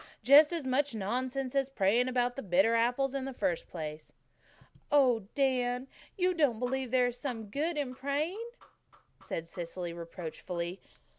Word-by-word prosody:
"Just 290 +4 +8
as 335 -5 -1
much 260 0 +1
nonsense 255 +5 -2
as 275 -1 +1
praying 235 +1 +2
about 245 -1 0
the 275 - -4
bitter 195 +2 +3
apples 245 +4 +2
in 275 -1 -2
the 270 - -5
first 170 -7 -1
place." 155 -2 -7 0.8
"Oh, 250 -8 +4
Dan, 255 -2 +1 0.3
don't 365 -2 +1
you 290 -6 +4
believe 255 +2 -2
there 250 0 +3
is 245 0 -3
some 230 -6 -5
good 310 +5 -1
in 275 -4 -2
praying?" 290 - -2 0.8
said 165 0 -5
Cecily 170 0 -5
reproachfully. 170 +1 -6
250 Hz, 150 wpm, -31 LUFS, 195-275 Hz, 0.8 s, Just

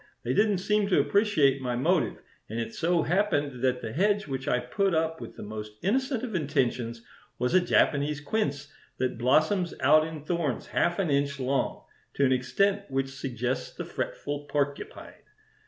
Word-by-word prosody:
They - - 0
didn't 210 -1 +3
seem 210 +2 +1
to 190 - +3
appreciate 155 -11 +3
my 125 -2 -1
motive, 125 - +1 0.3
and 110 +2 -3
it 115 0 -4
so 170 0 +1
happened 145 -9 0
that 125 -1 +1
the 110 -1 -4
hedge 205 +5 +2
which 135 -2 -5
I 125 - +3
put 175 +9 0
up 160 0 0
with - - -8
the - - -8
most 105 0 -7
innocent 260 +4 0
of 240 -4 -4
intentions 125 -7 -1 0.3
was 125 - 0
a 185 - +7
Japanese 150 -4 +2
quince 145 -4 -2 0.2
that 125 -2 -2
blossoms 155 - +2
out 155 +4 +5
in 155 -2 -8
thorns 160 -7 -1
half 175 0 0
an 185 -6 0
inch 140 0 0
long, 135 +1 -1 0.3
to 140 - +3
an 130 - +3
extent 195 +11 +1
which 135 0 -1
suggests 130 -2 -3
the - - -5
fretful 145 0 -4
porcupine. 145 -1 -3
145 Hz, 170 wpm, -28 LUFS, 130-180 Hz, 0.3 s, a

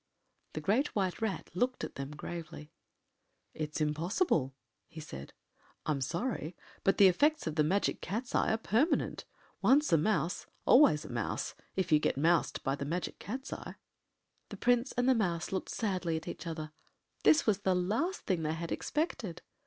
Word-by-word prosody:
” - - -43
The 155 - -4
Great 220 - +1
White 190 -2 0
Rat 220 -5 -2
looked 250 +8 0
at - - -4
them 140 0 -5
gravely. 160 -1 -7 0.8
“It’s 155 0 -4
impossible,” 155 - +1 0.3
he 160 - -10
said. 70 - -8 0.5
“I - - +1
am 140 -2 -1
sorry, 175 - -2 0.3
but 195 - +3
the 200 - +8
effects 295 - +3
of 160 - -2
the 155 0 +3
Magic 190 +7 +1
Cat’s 225 +8 -4
eye - - +2
are 220 - +2
permanent. 230 - +1 0.4
Once 280 - +4
a - - +7
mouse, 170 -1 0 0.2
always 205 - +6
a - - -8
mouse, 120 -2 -2 0.2
if 185 -3 -1
you 155 - +6
get 150 - 0
moused 165 +3 +2
by 135 - +1
the 140 - -3
Magic 170 +5 -3
Cat’s 255 - -5
eye.” - - -7 0.7
The - - -7
Prince 245 +1 +2
and 245 +1 +1
the 260 - +6
Mouse 175 -8 -1
looked 190 - -2
sadly 185 -6 -1
at 160 - -8
each - - -6
other. 155 -2 -5 0.5
This 315 - +5
was 205 -3 +2
the 190 -2 +1
last 220 - 0
thing 185 -4 -1
they 155 0 -1
had 165 0 -5
expected. 245 - -2
180 Hz, 180 wpm, -32 LUFS, 155-225 Hz, 0.8 s, the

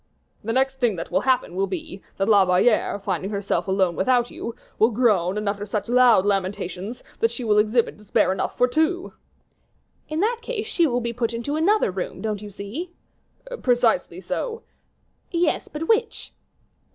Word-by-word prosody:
"The 225 - -2
next 265 +2 +1
thing 240 -6 +2
that 165 - -6
will - - +2
happen 255 -8 +1
will 195 +1 0
be, 185 +1 -6 0.2
that 195 - 0
La 205 -3 +6
Valliere, 190 +4 +2
finding 195 -1 -3
herself 200 -1 -1
alone 190 -2 +1
without 245 +4 +2
you, 230 - -6 0.2
will 220 - +5
groan 210 -6 +2
and 210 0 -3
utter 200 0 -1
such 205 0 -3
loud 240 -5 +5
lamentations, 195 +2 -2 0.2
that 455 - +3
she 255 - -6
will 210 -2 +3
exhibit 220 +2 +1
despair 210 -2 +1
enough 190 - -2
for 250 - +4
two." 320 +7 0 1.0
"In 310 +1 -2
that 460 +3 +1
case 460 -2 -4
she 350 -7 +2
will 245 -2 0
be 235 0 -3
put 235 -1 -2
into 260 +6 -3
another 365 - +2
room, 185 0 -5
don't 215 -2 -3
you 210 - -8
see?" 205 - -6 0.7
"Precisely 240 -8 +2
so." 450 - -4 0.7
"Yes, 340 -2 0
but 310 +2 -5
which?" 450 0 0
225 Hz, 175 wpm, -23 LUFS, 200-265 Hz, 1.0 s, La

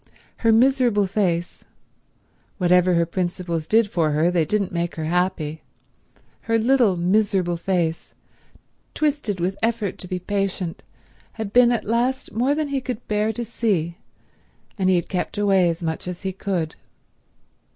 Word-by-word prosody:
Her 230 - +3
miserable 240 -3 +3
face—whatever 180 -1 -2
her 170 0 +3
principles 175 -2 -3
did 225 0 +4
for 170 -6 0
her 160 +4 +2
they 170 -3 +2
didn't 200 +2 -1
make 170 -1 -2
her 160 - -4
happy—her 175 +6 -4
little 230 -4 +3
miserable 185 -1 +1
face, 170 -2 -2 0.8
twisted 285 -10 -1
with 185 +3 -2
effort 225 -4 -1
to 185 - -7
be 185 - -3
patient, 190 -2 -3 0.5
had 220 -3 -6
been 245 -1 +6
at 240 - -1
last 245 +4 0
more 250 +6 +1
than 305 -1 -2
he 275 -1 -1
could 250 -3 -6
bear 210 +1 +1
to 240 +1 -4
see, 190 -7 -1 0.8
and 190 -3 +1
he 185 - +4
had 175 - 0
kept 185 +2 -3
away 195 -4 +3
as 170 +1 -4
much 160 +1 -3
as 180 0 -6
he 190 - -1
could. 180 -5 -3
190 Hz, 145 wpm, -22 LUFS, 175-225 Hz, 0.8 s, been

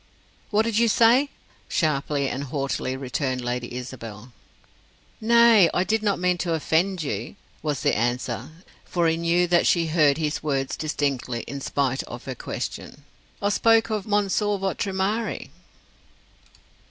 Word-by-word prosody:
"What 215 +1 +3
did 225 -1 0
you 235 - +4
say?" 240 +6 +4 0.4
sharply 145 -2 0
and 135 +2 -3
haughtily 135 -1 -2
returned 130 -1 -2
Lady 120 0 -3
Isabel. 125 -2 -8 0.9
"Nay, 230 -5 +6
I 180 - +3
did 220 +3 0
not 205 -2 +1
mean 180 0 +1
to 170 -2 0
offend 170 +3 0
you," 115 -5 -4 0.3
was 150 -4 -2
the - - +2
answer, 120 +2 -2 0.3
for 175 -2 0
he 160 - +2
knew 170 +2 +2
that 175 0 +3
she 170 -2 +3
heard 155 -3 +3
his 155 -2 -2
words 135 -3 -1
distinctly 135 -6 -2
in 140 0 -7
spite 135 -1 0
of 120 - -9
her 130 - -4
question. 140 +3 -6 0.4
"I 205 - +3
spoke 225 +2 +3
of 210 -2 -2
Monsieur 205 0 +1
votre 195 +1 -2
mari." 200 +4 -2
160 Hz, 145 wpm, -24 LUFS, 135-200 Hz, 0.9 s, Nay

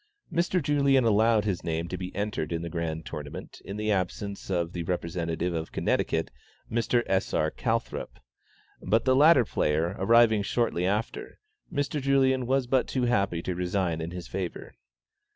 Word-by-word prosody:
Mr. 175 +2 +1
Julien 140 -3 +3
had 115 - +3
allowed 110 0 +3
his 95 -5 -1
name 85 0 -2
to 90 - -4
be 90 0 -5
entered 100 -6 -2
in 85 0 -2
the 85 - -5
Grand 80 -2 -3
Tournament 75 -1 -8
in 100 - -6
the 105 0 0
absence 100 +1 -2
of 85 -2 -1
the 85 - -3
representative 85 0 -2
of 80 -1 -4
Connecticut, - - 0 0.4
Mr. 120 +1 +1
S. 95 0 0
R. - - +1
Calthrop, - - -3 0.6
but 110 +5 +1
the 130 -1 +4
latter 145 -3 +6
player 80 +1 0
arriving 110 +1 +5
shortly 100 -4 0
after, 105 +3 -3 0.3
Mr. 145 -1 -1
Julien 130 -2 +2
was 135 0 +2
but 130 +1 +1
too 130 - -1
happy 100 -8 +1
to 90 - -2
resign 90 -2 -1
in 80 - -4
his 90 -1 -7
favor. 90 -3 -5
100 Hz, 170 wpm, -27 LUFS, 85-120 Hz, 0.6 s, latter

